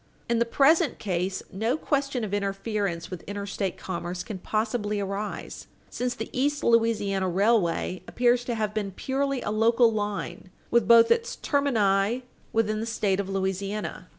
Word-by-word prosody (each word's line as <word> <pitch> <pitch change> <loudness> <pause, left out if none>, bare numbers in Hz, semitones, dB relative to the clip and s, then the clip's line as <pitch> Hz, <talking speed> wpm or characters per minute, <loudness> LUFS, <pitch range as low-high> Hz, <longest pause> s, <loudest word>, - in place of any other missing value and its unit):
In 235 -1 +1
the 235 - +3
present 295 +7 +3
case, 185 -1 -2
no 220 +8 0
question 275 -5 -1
of 205 -2 -4
interference 200 -3 -2
with 180 - -6
interstate 200 -1 -3
commerce 175 0 -4
can 200 -4 -6
possibly 215 +1 -1
arise, 200 +1 -5 0.2
since 245 0 -2
the 225 - -6
East 285 +3 0
Louisiana 210 -5 +2
Railway 185 -2 +1
appears 245 0 +2
to 240 - -2
have 215 -2 -1
been 210 -2 -2
purely 270 +3 -1
a 210 - -2
local 230 +2 +4
line, 205 -3 -4 0.2
with 235 -4 +3
both 230 0 +7
its 465 0 +1
termini 230 -5 +1 0.3
within 215 -1 +1
the 225 - -3
State 205 -4 0
of 200 -1 -2
Louisiana. 195 +2 -3
215 Hz, 150 wpm, -26 LUFS, 195-235 Hz, 0.3 s, both